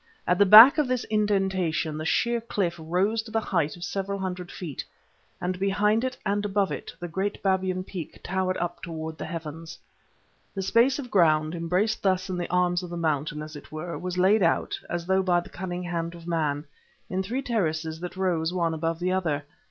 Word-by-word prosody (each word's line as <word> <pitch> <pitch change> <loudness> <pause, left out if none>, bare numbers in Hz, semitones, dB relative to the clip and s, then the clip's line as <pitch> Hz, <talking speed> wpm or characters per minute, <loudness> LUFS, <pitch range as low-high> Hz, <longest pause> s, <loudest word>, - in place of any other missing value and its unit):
At 180 +1 +2
the 205 - +6
back 225 +9 +11
of 295 - +2
this 250 -1 0
indentation 190 -7 +1
the 155 +1 -4
sheer 235 +7 +1
cliff 200 -6 -1
rose 185 +7 0
to 220 - -12
the 225 +1 +1
height 170 -8 -1
of 175 - -9
several 195 +2 -3
hundred 180 -2 -4
feet, 160 -7 -6 0.6
and 180 0 -2
behind 210 +3 +2
it 260 0 -2
and 205 +1 0
above 200 -1 0
it - - -5
the 175 - -5
great 190 +4 -2
Babyan 185 -1 +1
Peak 180 -4 -7
towered 185 0 -1
up 175 0 -3
towards 160 -1 -6
the - - -4
heavens. 165 0 -7 0.8
The 195 - -2
space 235 +7 +3
of 260 -4 -7
ground, 155 -4 +3
embraced 180 +6 0
thus 185 -1 +1
in 180 - -2
the 175 - -3
arms 180 0 +2
of 180 - -7
the 175 - -5
mountain, 150 -2 -1
as 155 0 -9
it 145 - -11
were, 160 +2 -5
was 180 0 -4
laid 195 +4 +4
out, 170 -2 +1
as 175 -1 -3
though 190 +1 +2
by 180 -2 +2
the 175 - -9
cunning 180 -1 -5
hand 170 -1 -3
of 170 -1 -12
man, 155 -3 -1 0.4
in 185 +1 -1
three 240 +8 -3
terraces 160 - -1
that 180 +1 -7
rose 175 -3 0
one 170 -2 0
above 165 +1 -1
the 180 +2 -1
other. 160 -6 0
180 Hz, 205 wpm, -26 LUFS, 165-195 Hz, 0.8 s, back